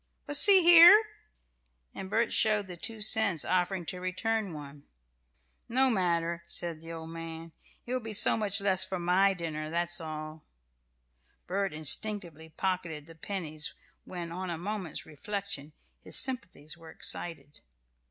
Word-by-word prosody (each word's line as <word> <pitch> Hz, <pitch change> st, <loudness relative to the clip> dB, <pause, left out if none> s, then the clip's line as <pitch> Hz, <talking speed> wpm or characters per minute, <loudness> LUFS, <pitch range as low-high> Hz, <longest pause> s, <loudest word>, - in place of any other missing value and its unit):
"But, 290 Hz, -, -2 dB
see 385 Hz, +3 st, +8 dB
here!" 345 Hz, +4 st, +9 dB, 0.9 s
And 190 Hz, -, -8 dB
Bert 225 Hz, +2 st, 0 dB
showed 215 Hz, -2 st, +2 dB
the 180 Hz, -2 st, -8 dB
two 220 Hz, +5 st, -3 dB
cents, 205 Hz, -6 st, +3 dB
offering 185 Hz, 0 st, -1 dB
to 180 Hz, +2 st, -5 dB
return 200 Hz, +3 st, -2 dB
one. 145 Hz, -1 st, -11 dB, 0.8 s
"No 260 Hz, +2 st, +2 dB
matter," 170 Hz, -4 st, -1 dB
said 170 Hz, -1 st, -3 dB
the 165 Hz, 0 st, -10 dB
old 165 Hz, 0 st, -8 dB
man, 165 Hz, 0 st, -8 dB, 0.3 s
"it 245 Hz, -, -5 dB
will 255 Hz, -, 0 dB
be 225 Hz, -2 st, -7 dB
so 210 Hz, -, +3 dB
much 210 Hz, -2 st, -2 dB
less 190 Hz, -1 st, +2 dB
for 190 Hz, -, -3 dB
my 185 Hz, +3 st, +2 dB
dinner, 155 Hz, -3 st, -5 dB
that's 170 Hz, +1 st, -2 dB
all." 155 Hz, 0 st, -7 dB, 1.0 s
Bert 195 Hz, +1 st, -2 dB
had 155 Hz, -, -8 dB
instinctively 160 Hz, 0 st, +3 dB
pocketed 165 Hz, -3 st, -4 dB
the 165 Hz, -, -11 dB
pennies 160 Hz, -3 st, -4 dB, 0.3 s
when, 175 Hz, -2 st, -7 dB
on 185 Hz, +1 st, -5 dB
a 170 Hz, -, -4 dB
moment's 190 Hz, -2 st, -5 dB
reflection, 160 Hz, -1 st, -6 dB, 0.3 s
his -, -, -1 dB
sympathies 235 Hz, -, -3 dB
were 165 Hz, -1 st, -14 dB
excited. 160 Hz, -2 st, -5 dB
180 Hz, 150 wpm, -29 LUFS, 160-205 Hz, 1.0 s, here